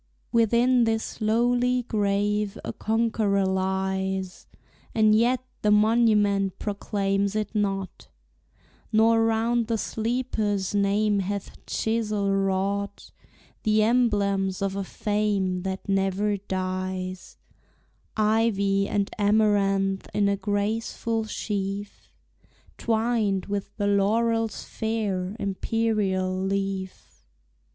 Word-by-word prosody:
Within 235 +2 +3
this 225 0 -2
lowly 245 +3 +2
grave 205 -2 0
a - - -4
Conqueror 220 -3 +1
lies, 190 0 -2 0.5
And 215 -1 +5
yet 245 +4 +2 0.2
the 210 - +2
monument 210 -3 +3
proclaims 200 -1 -1
it 215 0 -2
not, 195 -3 -2 0.8
Nor 225 +1 +4
round 225 +1 +1
the 230 -1 0
sleeper's 220 -4 -1
name 205 +1 +2
hath 200 +1 -4
chisel 215 -3 -1
wrought 195 +1 -1 0.5
The 215 0 +3
emblems 200 -5 +1
of 195 -1 -1
a 200 - -2
fame 200 -2 -1
that 190 +2 -5
never 195 +1 +1
dies, 185 -1 -4 0.8
Ivy 210 -2 +2
and 200 -1 0
amaranth 200 -2 +2
in 205 -1 +3
a 200 - +2
graceful 220 +2 -2
sheaf, 200 -1 -4 0.7
Twined 220 -4 0
with 200 0 -5
the 205 - -1
laurel's 225 +2 +1
fair, 205 -4 -2
imperial 195 -2 0
leaf. 195 - -4
205 Hz, 95 wpm, -25 LUFS, 195-220 Hz, 0.8 s, And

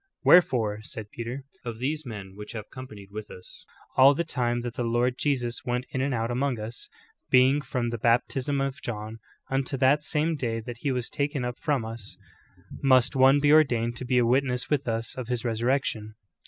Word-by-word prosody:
"Wherefore." 115 -11 +4
said 110 -1 -8
Peter, 120 +4 -5 0.2
"of 120 -3 -5
these 145 +4 -2
men 100 -4 -8
which 105 +3 -8
have 110 -2 -7
companied 105 -7 -10
with 105 0 -7
us 90 - -13 0.3
all 135 +2 +7
the 170 - 0
time 120 -6 -1
that 120 -1 -5
the 125 - -3
Lord 120 +2 +1
Jesus 125 -4 -1
went 125 +1 -2
in 130 - -1
and 140 +1 0
out 115 -1 -1
among 125 -1 0
us. 110 +3 -7 0.4
beginning 130 +3 +5
from 125 -5 -2
the 120 - -4
bap 115 +2 +4
tism 135 0 -1
of 135 +5 -8
John, 110 -3 -5 0.3
unto 135 0 -1
that 140 +3 +3
same 155 +2 0
day 115 -5 -2
that 120 +1 -7
he 140 - -1
was 125 -2 -2
taken 140 -3 -2
up 125 0 -5
from 140 -7 0
us, 110 -2 -8 0.6
must 130 0 +4
one 135 +1 +6
be 145 0 +3
ordained 120 -7 +4
to 130 - -6
be 125 0 +1
a 120 - +4
witness 125 +1 +1
with 140 -3 +1
us 115 0 -2
of 130 -3 -6
his 125 -1 -2
resurrection."' 115 -2 -1
125 Hz, 200 wpm, -27 LUFS, 115-135 Hz, 0.6 s, all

